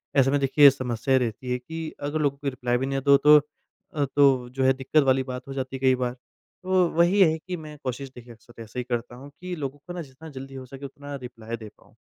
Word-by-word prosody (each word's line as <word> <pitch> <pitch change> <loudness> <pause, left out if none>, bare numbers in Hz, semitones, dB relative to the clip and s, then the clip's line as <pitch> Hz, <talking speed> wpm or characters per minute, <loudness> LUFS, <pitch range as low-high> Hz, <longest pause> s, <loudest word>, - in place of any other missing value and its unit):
ऐसे 135 0 +4
में 145 - +2
देखिए 140 +1 +7
समस्या 130 0 0
रहती 125 +1 -2
है 125 - +1
कि 160 +4 -6
अगर 145 +2 -1
लोगों 140 -2 0
के 140 0 -2
रिप्लाई 125 -2 -1
भी 130 - -2
नहीं 135 0 -2
दो 140 0 +7
तो 150 +1 +7 0.6
अ, 145 - +1
तो 135 -4 +4
जो 130 +1 -2
है 130 0 +5
दिक़्क़त 135 +3 +2
वाली 130 0 +3
बात 125 0 -7
हो 135 - -6
जाती 130 0 -4
है 130 - -5
कई 130 -1 +4
बार। 125 -1 -2 0.5
तो 185 -1 +3
वही 175 +4 +4
है 160 -3 +5
कि 180 +3 -6
मैं 155 -1 -10
कोशिश 130 +1 -4
देखिए 120 -1 -11
अक्सर 115 +1 -15
ऐसा 115 +2 -11
ही - - -1
करता 120 -1 -4
हूँ, 140 +3 -11
कि 180 +6 -7
लोगों 145 -3 -5
को 175 - -6
ना 175 - -5
जितना 150 +3 -11
जल्दी 135 -1 -9
हो 130 -1 -7
सके 135 +2 -9
उतना 145 +1 -8
रिप्लाई 115 -3 -7
दे 110 -1 -10
पाऊँ। - - -24
135 Hz, 255 wpm, -25 LUFS, 125-145 Hz, 0.6 s, देखिए